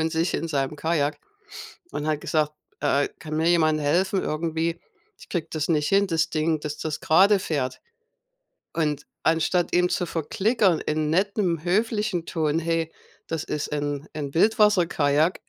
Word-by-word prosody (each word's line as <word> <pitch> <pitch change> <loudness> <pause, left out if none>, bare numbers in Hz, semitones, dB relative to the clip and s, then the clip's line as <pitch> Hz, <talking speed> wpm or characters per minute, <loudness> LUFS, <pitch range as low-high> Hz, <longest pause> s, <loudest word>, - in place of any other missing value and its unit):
von 160 0 0
sich 165 +2 0
in 165 - -2
seinem 140 0 -1
Kajak 155 -2 0 0.7
und 150 - -4
hat 155 -1 0
gesagt, 155 -1 0 0.3
äh 145 -1 +2
äh: - - -3
„Kann 155 -1 -5
mir 160 +2 +2
jemand 155 -3 +3
helfen 185 +6 +1
irgendwie? 165 +1 -2 0.4
Ich - - -15
kriege 165 -3 -3
das 155 0 -2
nicht 150 -3 +1
hin, 200 0 +3
das 165 -2 0
Ding, 155 0 0
dass 150 0 -5
das 155 -1 -3
gerade 195 +6 +5
fährt.” 145 -8 -2 0.9
Und 150 -3 -1 0.2
anstatt 165 +2 +1
ihm 180 0 +4
zu 180 0 -1
verklickern 190 - +1
in 155 0 -1
nettem 185 -2 0
höflichen 210 -2 0
Ton: 160 -2 0
„Hey, 165 -1 -1 0.3
das 160 -1 -3
ist 150 -1 -4
'n 145 0 -2
'n 145 -2 -5
Wildwasserkajak, 175 -7 +3
160 Hz, 160 wpm, -25 LUFS, 150-175 Hz, 0.9 s, gerade